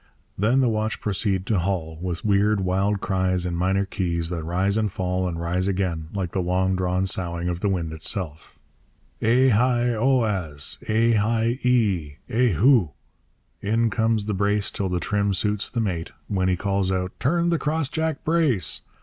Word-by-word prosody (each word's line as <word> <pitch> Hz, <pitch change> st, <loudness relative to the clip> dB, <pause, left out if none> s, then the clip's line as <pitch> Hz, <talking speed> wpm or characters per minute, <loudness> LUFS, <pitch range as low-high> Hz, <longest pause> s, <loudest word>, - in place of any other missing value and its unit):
Then 115 Hz, +7 st, +2 dB
the 130 Hz, -, +3 dB
watch 110 Hz, -1 st, -1 dB
proceed 95 Hz, -2 st, -1 dB
to 105 Hz, -3 st, +1 dB
haul, 85 Hz, -3 st, -2 dB
with 90 Hz, 0 st, -4 dB
weird, 100 Hz, 0 st, +3 dB
wild 95 Hz, +2 st, 0 dB
cries 95 Hz, -2 st, 0 dB
in 90 Hz, -, -2 dB
minor 95 Hz, +3 st, +1 dB
keys 85 Hz, -3 st, -2 dB
that 85 Hz, -2 st, -3 dB
rise 95 Hz, +5 st, 0 dB
and 110 Hz, -2 st, 0 dB
fall 90 Hz, 0 st, -1 dB
and 85 Hz, -2 st, -4 dB
rise 90 Hz, +2 st, -1 dB
again, 90 Hz, -5 st, -1 dB
like 95 Hz, -4 st, -3 dB
the 95 Hz, -, -1 dB
long 95 Hz, +1 st, +1 dB
drawn 90 Hz, 0 st, 0 dB
soughing 85 Hz, -2 st, -2 dB
of 85 Hz, -1 st, -2 dB
the 100 Hz, -, 0 dB
wind 85 Hz, -4 st, -2 dB
itself. 80 Hz, 0 st, -4 dB, 0.6 s
Eh 125 Hz, +4 st, +4 dB
heigh 120 Hz, +1 st, +2 dB
o 130 Hz, +2 st, +2 dB
az! 80 Hz, -9 st, -1 dB
Eh 115 Hz, +2 st, +3 dB
heigh 115 Hz, +3 st, +1 dB
ee! 100 Hz, -, +1 dB
Eh 125 Hz, +3 st, +2 dB
hugh! 105 Hz, -, +4 dB, 0.7 s
In 115 Hz, +2 st, +1 dB
comes 110 Hz, -1 st, +1 dB
the 105 Hz, -, -2 dB
brace 100 Hz, 0 st, 0 dB
till 95 Hz, -2 st, -2 dB
the 90 Hz, -1 st, -1 dB
trim 100 Hz, +3 st, 0 dB
suits 105 Hz, +2 st, 0 dB
the 120 Hz, -, -3 dB
mate, 90 Hz, -7 st, -2 dB, 0.2 s
when 95 Hz, -2 st, 0 dB
he 90 Hz, -, +1 dB
calls 100 Hz, -1 st, 0 dB
out 90 Hz, -1 st, -1 dB
'Turn 170 Hz, +5 st, +1 dB
the 170 Hz, -2 st, +1 dB
crossjack 160 Hz, 0 st, -1 dB
brace!' 150 Hz, -, +1 dB
100 Hz, 175 wpm, -24 LUFS, 90-110 Hz, 0.7 s, Eh